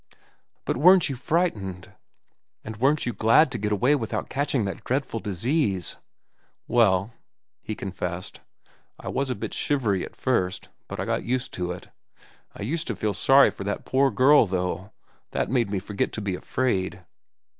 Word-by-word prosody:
"But - - -1
weren't 180 +3 +6
you 135 - -3
frightened? 115 - -2 0.7
And 110 0 -7
weren't 140 +6 +2
you 120 - -2
glad 115 +8 +4
to 120 - -3
get 105 +1 -2
away 125 +8 +3
without 120 -7 -2
catching 140 -4 0
that 95 - -5
dreadful 130 -3 -1
disease?" 105 - -1 0.7
"Well," 110 -3 +3 0.5
he 110 - -5
confessed, 90 -2 -5 0.6
"I - - -6
was 135 -1 -1
a 125 - -1
bit - - -5
shivery 115 -10 0
at - - -9
first; 95 -8 -1 0.2
but - - -7
I - - -1
got - - -1
used 125 +1 -2
to 90 -1 -3
it. 90 - -8 0.7
I - - -6
used 155 +9 -2
to 115 - -2
feel 105 +2 -1
sorry 135 +8 +5
for - - -8
that 100 - -3
poor 135 +1 +3
girl, 135 -1 +5
though. 90 +2 -3 0.4
That - - -1
made 120 -5 +1
me 100 - -1
forget 100 +2 -2
to 110 - -4
be 100 -2 -2
afraid. 95 -3 -2
110 Hz, 165 wpm, -25 LUFS, 95-135 Hz, 0.7 s, weren't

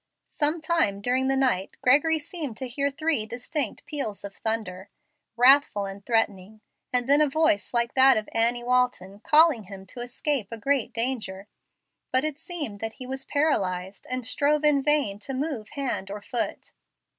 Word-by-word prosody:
Some 305 +3 +1
time 315 -12 +1
during 255 +5 0
the 270 - +2
night 245 -8 0
Gregory 300 +5 +4
seemed 295 -6 -6
to 260 - -4
hear 280 +3 -1
three 285 -6 -1
distinct 245 +2 -4
peals 280 -9 -4
of 200 -1 -8
thunder, 205 -4 -3 0.5
wrathful 250 -5 +5
and 195 +1 -8
threatening, 215 -2 -1 0.3
and 245 0 +1
then 285 +2 +5
a 300 - +3
voice 315 +2 +1
like 235 -1 0
that 265 -1 +6
of 215 - -3
Annie 235 +1 +1
Walton 245 -6 0
calling 300 -3 +4
him 190 0 -10
to 195 - -10
escape 245 -1 -2
a 230 - -5
great 275 +2 0
danger. 230 -5 -3 0.7
But 260 +1 +3
it 305 -1 -3
seemed 305 - -5
that 225 +1 -4
he 255 - -8
was 265 +1 -5
paralyzed, 195 - -1
and 255 -1 -2
strove 295 +4 +2
in 295 -2 +4
vain 275 -9 +1
to 270 +5 -5
move 265 -6 -3
hand 250 -8 -3
or 205 +1 -5
foot. 240 +1 -4
250 Hz, 170 wpm, -26 LUFS, 215-285 Hz, 0.7 s, that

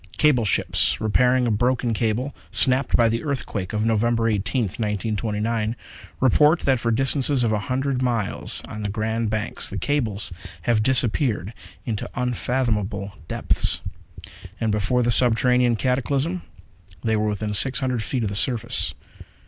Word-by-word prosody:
Cable 135 -7 +3
ships 100 - +1
repairing 125 +4 +2
a 120 - +1
broken 120 +2 +1
cable, 115 +5 -1 0.2
snapped 130 +1 +3
by 115 - +5
the 115 +1 -1
earthquake 125 - -3
of 105 0 -1
November 115 +1 +1
18th, 105 0 -1
1929, 110 +1 -1 0.4
report 150 +5 +4
that 130 -3 +2
for 115 - -1
distances 135 +2 +2
of 115 - +1
a 105 - +1
hundred 130 0 0
miles 120 -6 0
on 105 - -7
the 105 - -2
Grand 110 +2 -1
Banks 110 0 -2
the - - -5
cables 110 -10 -1 0.3
have 115 -3 +2
disappeared 120 - +1 0.3
into 110 -3 -3
unfathomable 115 -5 -1
depths. - - 0 0.8
And 110 -2 0
before 105 +4 +1
the 120 - +2
subterranean 125 +1 +3
cataclysm, 135 - 0 0.6
they 110 -1 +1
were 105 0 0
within 105 0 -2
six 130 +6 +3
hundred 130 -4 -1
feet 125 +2 -2
of 105 - -1
the 100 - -5
surface. 115 +2 0
115 Hz, 145 wpm, -23 LUFS, 105-130 Hz, 0.8 s, by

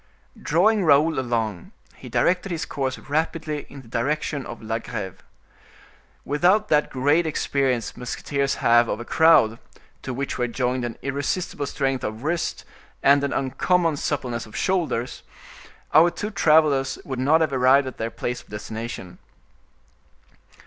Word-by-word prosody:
Drawing 195 +7 +3
Raoul 155 -1 +4
along, 115 -7 -3 0.2
he - - -11
directed 180 +2 +1
his 165 -2 -2
course 135 -2 -3
rapidly 155 0 -3
in 140 -2 -11
the - - -17
direction 140 +3 -2
of 120 - -8
La 110 +1 -3
Greve. 105 -5 -6 1.0
Without 180 +9 +2
that 150 -1 +3
great 145 +6 +2
experience 135 -6 -1
musketeers 140 +3 -2
have 120 0 +4
of - - -2
a 120 - -7
crowd, 140 -9 +4 0.4
to - - -5
which 135 +2 -4
were 125 - +1
joined 125 +1 -1
an 120 -1 -4
irresistible 140 +2 -2
strength 135 -2 -1
of 110 +3 -5
wrist, 165 +3 -2 0.4
and 140 +1 +5
an 140 - -1
uncommon 165 +5 +1
suppleness 125 -6 -3
of 110 - -14
shoulders, 165 -10 -1 0.7
our 160 +3 +7
two 210 +4 -5
travelers 150 -7 +3
would 130 -2 -4
not 150 +5 +3
have 155 -3 +1
arrived 130 +2 +4
at 130 - -7
their 115 - -2
place 120 +1 -4
of - - -24
destination. 105 -2 -7
140 Hz, 145 wpm, -23 LUFS, 120-155 Hz, 1.0 s, our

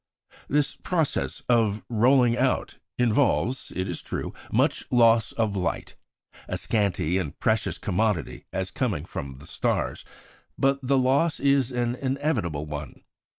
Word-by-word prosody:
This 145 0 +1
process 165 -5 -1
of 110 -4 +2
rolling 120 +1 +4
out - - 0 0.2
involves, 125 +1 +1
it 95 +1 -1
is 90 - -4
true, - - -5 0.2
much - - +2
loss 115 -3 +4
of 110 -3 0
light 90 -3 -2 0.5
a - - -2
scanty 95 -5 0
and 80 -4 -5
precious 110 -2 +1
commodity, 95 - -1
as - - -3
coming - - -1
from 70 -1 -6
the 70 +2 -13
stars; - - -1 0.5
but 135 0 +2
the 135 +1 +2
loss 135 +5 +2
is 140 -2 +2
an 120 -1 0
inevitable 130 - -1
one. 75 -1 -7
115 Hz, 135 wpm, -26 LUFS, 95-135 Hz, 0.5 s, rolling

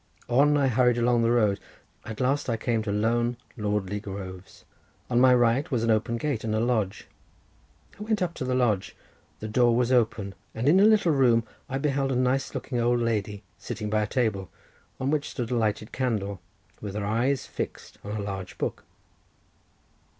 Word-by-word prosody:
On 145 +4 +4
I 140 -1 +3
hurried 125 -1 +3
along 120 0 +3
the 115 - +2
road; 110 -4 +2 0.5
at 110 -1 -7
last 135 +1 0
I 115 - 0
came 115 0 0
to 110 -1 -3
lone, 120 +3 +1 0.2
lordly 105 -3 -2
groves. 95 -2 -9 0.5
On 120 0 +4
my 130 0 +7
right 120 +3 +2
was 125 -6 0
an 115 - +2
open 110 +2 +1
gate 135 -3 -2
and 110 -1 -1
a - - +1
lodge. 110 -5 0 0.9
I - - -10
went 215 -1 0
up 170 -1 -2
to 150 - -5
the 130 0 0
lodge. 110 -7 0 0.5
The 110 - -4
door 120 +2 +3
was 125 +1 +1
open, 110 -5 +1 0.2
and 115 +4 -1
in 175 +6 +6
a 200 - +6
little 215 -6 +4
room 125 -5 +4 0.3
I 135 - -1
beheld 135 -1 0
a - - 0
nice 130 +2 0
looking 125 -3 -3
old 120 +1 +2
lady 105 -3 -2 0.2
sitting 105 -1 -5
by 110 0 +2
a 105 - -1
table, 105 -6 -1 0.5
on 130 +2 0
which 150 -1 0
stood 120 -2 -4
a - - +1
lighted 110 -1 -1
candle, 100 -7 -2 0.4
with 105 -1 -6
her 105 -1 -2
eyes 120 +6 0
fixed - - -6
on 105 - -5
a 105 - -3
large 95 -2 -6
book. - - -3
120 Hz, 190 wpm, -26 LUFS, 105-130 Hz, 0.9 s, my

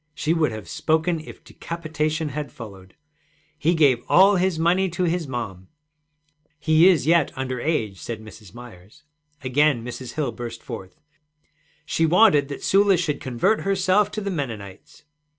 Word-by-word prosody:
She 155 +1 0
would 160 -6 +1
have 110 -2 -8
spoken 160 +2 0
if 155 - -12
decapitation 155 -2 -4
had 145 +1 -5
followed. 95 -5 -12 0.6
'He 170 +3 +2
gave 140 -7 +3
all 195 +3 +6
his 180 -2 0
money 180 +4 +2
to 175 +2 -3
his 170 -2 -1
mom.' 105 -8 -6 0.9
'He 155 +3 +5
is 160 -8 +2
yet 165 -1 +3
under 130 -1 -4
age,' 110 - -2
said 115 +4 -5
Mrs. 110 -3 -13
Myers. 120 +3 -14 0.4
Again 130 -1 +2
Mrs. 125 0 -7
Hill 150 -6 -2
burst 115 -2 -8
forth: 95 -7 -9 0.9
'She 165 - +1
wanted 175 -5 +4
that 140 - -8
Sula 195 -1 +4
should 155 -4 -2
convert 130 - 0
herself 195 +1 +2
to 215 - -3
the 200 -1 -3
Mennonites.' 110 - -7
150 Hz, 150 wpm, -23 LUFS, 120-170 Hz, 0.9 s, all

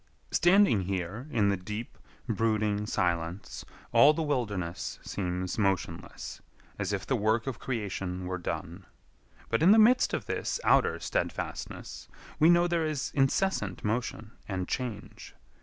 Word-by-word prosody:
Standing 175 - +5
here 95 - -3
in 105 -7 +2
the 100 - +1
deep, 105 +5 -6 0.3
brooding 110 -2 0
silence 85 -2 -2 0.3
all 145 +2 +7
the 165 - -1
wilderness 105 - -2
seems 90 0 -3
motionless, 95 -3 -2 0.4
as - - -1
if - - -2
the - - +1
work 110 +2 +1
of 130 -5 -4
creation 95 -6 -3
were 90 0 -3
done. 90 +1 -5 0.6
But 115 - +1
in 170 - +6
the 215 - +8
midst 240 +4 +5
of - - -4
this - - -2
outer - - +3
steadfastness - - -4 0.3
we 160 +1 +6
know 175 0 +5
there 170 -2 +1
is 150 -2 -2
incessant 135 - +1
motion 110 0 -2 0.2
and 95 -2 -3
change. 125 -5 -5
110 Hz, 140 wpm, -29 LUFS, 95-140 Hz, 0.6 s, the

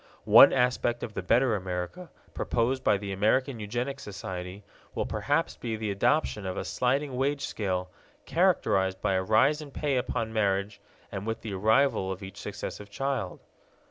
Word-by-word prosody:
One - - +9
aspect 125 -2 +1
of 110 - -5
the - - -3
better 115 +5 +3
America, 95 - -5 0.2
proposed 125 +3 0
by 105 - +3
the 100 0 -6
American 115 +6 +1
Eugenic 120 +6 -3
Society, 95 -2 -7 0.3
will - - -1
perhaps - - -1
be 115 -2 -3
the 110 -1 -3
adoption 105 +1 +1
of 95 -1 -4
a - - -3
sliding 135 +2 0
wage 140 +2 0
scale, 90 -3 -3 0.3
characterized 95 -1 +2
by 95 - 0
a 95 - +2
rise 120 +10 +3
in 150 - -9
pay 140 -1 -1
upon 115 -3 -2
marriage 100 -1 0 0.3
and 100 +1 -5
with 115 - -3
the 110 -3 -5
arrival 110 0 +2
of 95 +1 -6
each 95 - -9
successive 105 0 -6
child. 130 -2 -3
110 Hz, 165 wpm, -28 LUFS, 95-130 Hz, 0.3 s, One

